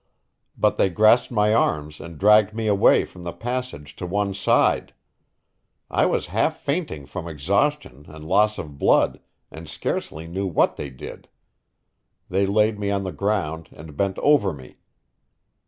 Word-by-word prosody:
But -, -, +1 dB
they 95 Hz, -, +4 dB
grasped 110 Hz, +7 st, +4 dB
my 105 Hz, -2 st, +2 dB
arms 75 Hz, -8 st, 0 dB
and 85 Hz, -2 st, -10 dB
dragged 105 Hz, +3 st, +4 dB
me 115 Hz, -1 st, -3 dB
away 100 Hz, -2 st, +4 dB
from 90 Hz, -, -14 dB
the 85 Hz, 0 st, -5 dB
passage 120 Hz, -, -5 dB
to 90 Hz, -, -5 dB
one 100 Hz, +2 st, -1 dB
side. 95 Hz, -, +1 dB, 1.0 s
I -, -, +2 dB
was -, -, -1 dB
half 135 Hz, +9 st, +1 dB
fainting 140 Hz, -, -3 dB
from 85 Hz, +4 st, -7 dB
exhaustion 85 Hz, -, -1 dB
and 75 Hz, 0 st, -11 dB
loss 105 Hz, +4 st, +3 dB
of 75 Hz, -4 st, -8 dB
blood, -, -, +3 dB, 0.3 s
and -, -, -10 dB
scarcely 80 Hz, +2 st, -4 dB
knew 95 Hz, +4 st, -3 dB
what 85 Hz, -, +1 dB
they 70 Hz, -, -6 dB
did. 65 Hz, -, -11 dB, 1.0 s
They 95 Hz, +2 st, +1 dB
laid 105 Hz, +1 st, +2 dB
me 100 Hz, -1 st, -2 dB
on 100 Hz, -1 st, -1 dB
the 95 Hz, -, -4 dB
ground 80 Hz, -6 st, -2 dB
and 75 Hz, 0 st, -12 dB
bent 95 Hz, +3 st, -1 dB
over 140 Hz, -10 st, +3 dB
me. 65 Hz, -3 st, -13 dB
95 Hz, 155 wpm, -23 LUFS, 80-105 Hz, 1.0 s, they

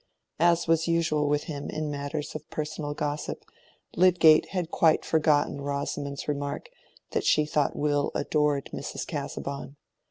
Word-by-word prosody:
As 170 Hz, +1 st, +3 dB
was 165 Hz, 0 st, +2 dB
usual 155 Hz, -3 st, +1 dB
with 150 Hz, 0 st, +1 dB
him 145 Hz, -2 st, -5 dB
in 155 Hz, -1 st, -3 dB
matters 145 Hz, +1 st, -4 dB
of 155 Hz, 0 st, -8 dB
personal 150 Hz, -1 st, -4 dB
gossip, 150 Hz, 0 st, -3 dB, 0.5 s
Lydgate 170 Hz, -4 st, +6 dB
had 180 Hz, -4 st, -3 dB
quite 160 Hz, -2 st, +3 dB
forgotten 150 Hz, -2 st, +2 dB
Rosamond's 140 Hz, 0 st, -3 dB
remark 145 Hz, -1 st, -3 dB, 0.4 s
that -, -, 0 dB
she 150 Hz, -, +3 dB
thought 150 Hz, -1 st, 0 dB
Will 145 Hz, -1 st, +1 dB
adored 150 Hz, -1 st, 0 dB
Mrs. -, -, -5 dB
Casaubon. 140 Hz, 0 st, -5 dB
150 Hz, 135 wpm, -27 LUFS, 145-160 Hz, 0.5 s, Lydgate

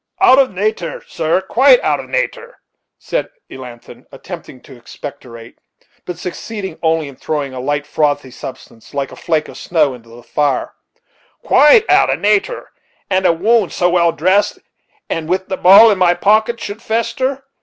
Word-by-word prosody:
"Out 260 Hz, -, +6 dB
of 270 Hz, -, +3 dB
nater, 195 Hz, -2 st, -3 dB
sir, 165 Hz, +2 st, -1 dB
quite 265 Hz, -, +4 dB
out -, -, 0 dB
of -, -, -9 dB
nater," -, -, -3 dB, 0.4 s
said -, -, -3 dB, 0.2 s
Elnathan, 125 Hz, -3 st, -12 dB
attempting 130 Hz, -, -10 dB
to 135 Hz, -, -15 dB
expectorate, 120 Hz, -1 st, -11 dB, 0.5 s
but 180 Hz, -2 st, -6 dB
succeeding 190 Hz, +1 st, -7 dB
only 160 Hz, -2 st, 0 dB
in 140 Hz, -, -11 dB
throwing 145 Hz, -1 st, -4 dB
a 130 Hz, -, -6 dB
light, 145 Hz, +3 st, -2 dB
frothy 145 Hz, -4 st, -1 dB
substance, 130 Hz, 0 st, -11 dB
like 140 Hz, -1 st, -3 dB
a -, -, -10 dB
flake 155 Hz, -2 st, -1 dB
of -, -, -11 dB
snow, 155 Hz, -6 st, +1 dB
into 115 Hz, -2 st, -14 dB
the 120 Hz, +1 st, -14 dB
fire 145 Hz, 0 st, -1 dB, 0.7 s
"quite 420 Hz, +10 st, +5 dB
out -, -, +4 dB
of -, -, -2 dB
nater 210 Hz, -, 0 dB, 0.4 s
that 185 Hz, 0 st, +2 dB
a -, -, +5 dB
wound 205 Hz, +4 st, +1 dB
so 175 Hz, 0 st, +1 dB
well 170 Hz, -1 st, +3 dB
dressed, 190 Hz, +6 st, +1 dB, 0.5 s
and 165 Hz, -1 st, -4 dB
with 185 Hz, +1 st, -1 dB
the 190 Hz, -, -1 dB
ball 200 Hz, +5 st, +7 dB
in 200 Hz, -, -1 dB
my 175 Hz, -1 st, +3 dB
pocket, 220 Hz, +4 st, +2 dB
should 205 Hz, +2 st, -7 dB
fester. 235 Hz, +4 st, -2 dB
175 Hz, 165 wpm, -16 LUFS, 145-215 Hz, 0.7 s, ball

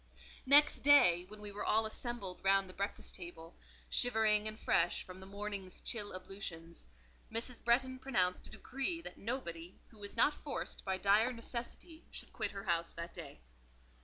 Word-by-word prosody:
Next 290 Hz, +2 st, +7 dB
day, 180 Hz, -12 st, +6 dB
when 215 Hz, +1 st, -11 dB
we 205 Hz, -1 st, -5 dB
were 205 Hz, +1 st, -5 dB
all 220 Hz, +1 st, +3 dB
assembled 220 Hz, -4 st, -4 dB
round 195 Hz, 0 st, +4 dB
the 185 Hz, -, -11 dB
breakfast 200 Hz, +2 st, -4 dB
table, 170 Hz, -2 st, -10 dB, 0.3 s
shivering 220 Hz, -, +3 dB
and 215 Hz, +1 st, -5 dB
fresh 175 Hz, -, +2 dB
from 185 Hz, 0 st, -10 dB
the 190 Hz, -, -11 dB
morning's 200 Hz, -2 st, -4 dB
chill 205 Hz, -4 st, -2 dB
ablutions, 175 Hz, -, -7 dB, 0.4 s
Mrs. 230 Hz, +2 st, -2 dB
Bretton 260 Hz, +2 st, +2 dB
pronounced 185 Hz, -9 st, 0 dB
a -, -, -12 dB
decree 275 Hz, +6 st, -2 dB
that -, -, -9 dB
nobody, 180 Hz, -7 st, -3 dB
who 220 Hz, -, -17 dB
was 205 Hz, +3 st, -7 dB
not 290 Hz, +6 st, +5 dB
forced 295 Hz, -1 st, -5 dB
by 190 Hz, -1 st, -1 dB
dire 205 Hz, +5 st, +4 dB
necessity, 245 Hz, +7 st, -7 dB
should -, -, -8 dB
quit 215 Hz, -3 st, -1 dB
her 200 Hz, -1 st, -7 dB
house 170 Hz, -3 st, 0 dB
that 170 Hz, 0 st, -6 dB
day. -, -, -8 dB
205 Hz, 165 wpm, -35 LUFS, 185-240 Hz, 0.4 s, Next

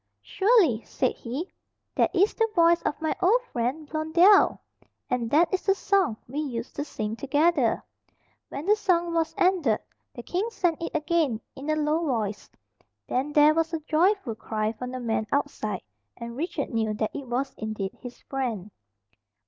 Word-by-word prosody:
"Surely," 385 Hz, -, +3 dB
said 255 Hz, -, 0 dB
he, 265 Hz, +9 st, -5 dB, 0.5 s
"that -, -, +2 dB
is 390 Hz, +4 st, +3 dB
the 450 Hz, -1 st, +1 dB
voice 335 Hz, 0 st, +5 dB
of -, -, -2 dB
my 315 Hz, -1 st, -1 dB
old 400 Hz, +7 st, +5 dB
friend 255 Hz, +6 st, -2 dB
Blondel, 325 Hz, +6 st, +4 dB, 0.5 s
and 240 Hz, -2 st, 0 dB
that 330 Hz, -, +3 dB
is 375 Hz, -, +1 dB
the 390 Hz, -, +5 dB
song 380 Hz, -, +1 dB
we 275 Hz, +5 st, -4 dB
used 245 Hz, -6 st, -4 dB
to 290 Hz, -, -2 dB
sing 215 Hz, -7 st, -4 dB
together." 290 Hz, -1 st, +1 dB, 0.7 s
When 280 Hz, +3 st, -6 dB
the 415 Hz, +2 st, +5 dB
song 350 Hz, -5 st, +1 dB
was 325 Hz, -1 st, 0 dB
ended, 350 Hz, -, +3 dB, 0.4 s
the 240 Hz, -, -7 dB
king 380 Hz, -, -2 dB
sang 350 Hz, -8 st, 0 dB
it 335 Hz, -, -4 dB
again 305 Hz, -6 st, +1 dB, 0.2 s
in 280 Hz, +3 st, -7 dB
a 310 Hz, -, +2 dB
low 305 Hz, +2 st, +1 dB
voice. 220 Hz, -8 st, -2 dB, 0.6 s
Then 270 Hz, +4 st, -1 dB
there 295 Hz, +1 st, +6 dB
was 325 Hz, +1 st, 0 dB
a -, -, -3 dB
joyful 330 Hz, -, +1 dB
cry 215 Hz, 0 st, -2 dB
from 250 Hz, +3 st, -7 dB
the 255 Hz, 0 st, -5 dB
man 225 Hz, -2 st, -1 dB
outside, 280 Hz, -7 st, -2 dB, 0.3 s
and 235 Hz, 0 st, -7 dB
Richard 300 Hz, 0 st, -3 dB
knew 220 Hz, -2 st, 0 dB
that 215 Hz, 0 st, -2 dB
it 280 Hz, -2 st, -6 dB
was 255 Hz, +3 st, -2 dB
indeed 215 Hz, -3 st, -4 dB
his 245 Hz, -1 st, -9 dB
friend. 230 Hz, -8 st, -3 dB
295 Hz, 170 wpm, -26 LUFS, 235-340 Hz, 0.7 s, there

